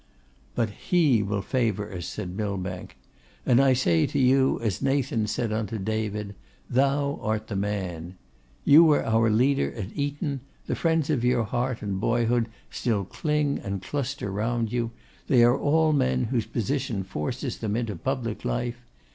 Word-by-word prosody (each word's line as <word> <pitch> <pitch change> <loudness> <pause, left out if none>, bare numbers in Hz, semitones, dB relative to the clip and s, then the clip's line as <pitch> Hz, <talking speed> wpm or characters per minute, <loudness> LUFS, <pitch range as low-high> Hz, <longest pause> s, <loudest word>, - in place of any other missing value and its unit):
'But 115 -3 0
He 145 - +2
will 100 0 -2
favour 110 -5 -1
us,' 85 -3 -5
said 95 -4 -5
Millbank. 95 -3 -4 0.5
'And 125 +1 +5
I 135 -1 +5
say 85 -11 +2
to - - -3
you 135 0 +3
as 110 -6 -1
Nathan 135 -5 +1
said 110 +1 -1
unto 110 0 -2
David, 105 0 -3 0.3
"Thou 140 +2 +1
art 110 0 -1
the 100 - -3
man!" 95 -4 -3 0.5
You 150 +4 +8
were 155 -3 +4
our 115 0 +3
leader 130 +6 +2
at 105 -2 -6
Eton; 145 0 -2 0.3
the - - -2
friends 160 -2 +1
of 130 -6 0
your 125 -1 +3
heart 120 +3 -2
and 100 -2 -2
boyhood 115 +1 +1 0.2
still 105 -5 -1
cling 150 - -1
and 100 0 -4
cluster 135 -4 -3
round 115 +2 -1
you! 120 -2 0 0.4
they 125 -3 +5
are 120 +1 +5
all 155 +2 +2
men 65 - +2
whose 115 -2 -1
position 120 -2 -2
forces 120 - -4
them 105 -2 -2
into 115 -4 -2
public 120 +2 -3
life. 120 0 -2
115 Hz, 160 wpm, -26 LUFS, 105-135 Hz, 0.5 s, You